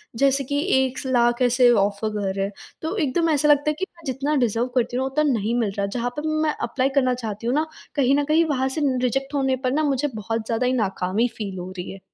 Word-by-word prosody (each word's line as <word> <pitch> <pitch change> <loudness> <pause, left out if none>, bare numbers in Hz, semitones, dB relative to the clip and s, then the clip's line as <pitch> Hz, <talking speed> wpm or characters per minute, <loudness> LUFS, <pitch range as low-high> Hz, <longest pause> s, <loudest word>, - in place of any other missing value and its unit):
जैसे 275 +2 +2
कि 285 - +1 0.3
1 260 0 -5
स - - -6
लाख 240 -1 +2
ऐसे 245 0 +5
ऑफ़र 205 0 +1
कर 195 -2 -1
रहे 195 - 0
हैं। 200 - -5 0.3
तो 320 +5 -3
एकदम 330 0 +1
ऐसा 300 -1 +2
लगता 295 0 +4
है 305 - +1
कि 380 - 0
मैं 335 - -19
जितना 275 +3 -1
डिज़र्व 230 +2 -1
करती 245 0 +1
हूँ 260 - 0
उतना 285 +3 0
नहीं 225 0 0
मिल 215 -4 0
रहा। 200 - +1
जहाँ 245 +1 -1
पर 305 - -2 0.2
मैं 305 - +2
एप्लाई 255 +3 0
करना 255 -1 +2
चाहती 225 -2 -5
हूँ 250 - +1
ना, 310 - +2 0.3
कहीं 275 -2 +3
न 290 - +1
कहीं 315 +3 +3
वहाँ 265 -4 0
से 310 - 0 0.2
रिजेक्ट 270 +3 -1
होने 265 -1 +2
पर 255 - +2
न 310 +1 +1
मुझे 280 0 +1
बहुत 220 +1 -3
ज़्यादा 230 +2 0
ही 255 - +2
नाकामी 200 0 0
फ़ील 200 -4 -5
हो 180 +1 -6
रही 180 - -5
है। 195 - -10
255 Hz, 250 wpm, -23 LUFS, 225-280 Hz, 0.3 s, ऐसे